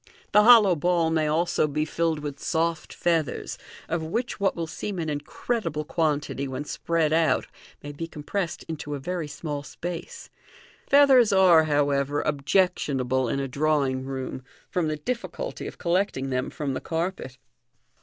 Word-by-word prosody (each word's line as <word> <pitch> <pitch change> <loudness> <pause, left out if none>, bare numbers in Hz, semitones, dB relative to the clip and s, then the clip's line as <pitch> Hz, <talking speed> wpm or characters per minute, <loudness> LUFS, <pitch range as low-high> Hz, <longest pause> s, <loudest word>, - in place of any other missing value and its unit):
The 210 - +7
hollow 215 -5 +7
ball 170 0 +1
may 160 -1 +1
also 155 0 +1
be 150 +1 -1
filled 160 -1 -1
with 145 -2 -6
soft 165 -1 -1
feathers, 165 -5 -1 0.3
of 165 0 -1
which 230 +10 -2
ya - - -7
MODEXN - - -16
MAGIL - - -2
what - - +2
will 170 - -2
seem 190 +5 -5
an 160 -2 -2
incredible 150 +2 -3
quantity 150 -4 -1
when 130 +2 -5
spread 160 0 0
out 165 0 +2 0.4
may 145 - -6
be 165 +3 -6
com 150 -2 -10
pressed 180 +1 -3
into 150 -2 -5
a - - -5
very 175 +2 -3
small 145 0 -5
space. 170 +3 -7 0.6
Feathers 270 -5 +6
are, 180 -5 +6
however, 145 -1 +1
objectionable 140 -5 +1
in 140 - -1
a 135 - -2
drawing 140 -2 0
room, 130 -1 -5 0.3
from 175 -3 0
the 155 0 -2
difficulty 250 - -4
of - - -9
collecting 170 -7 0
them 125 0 -1
from 140 -3 -3
the - - -4
carpet. 165 -6 -3
155 Hz, 165 wpm, -26 LUFS, 145-175 Hz, 0.6 s, The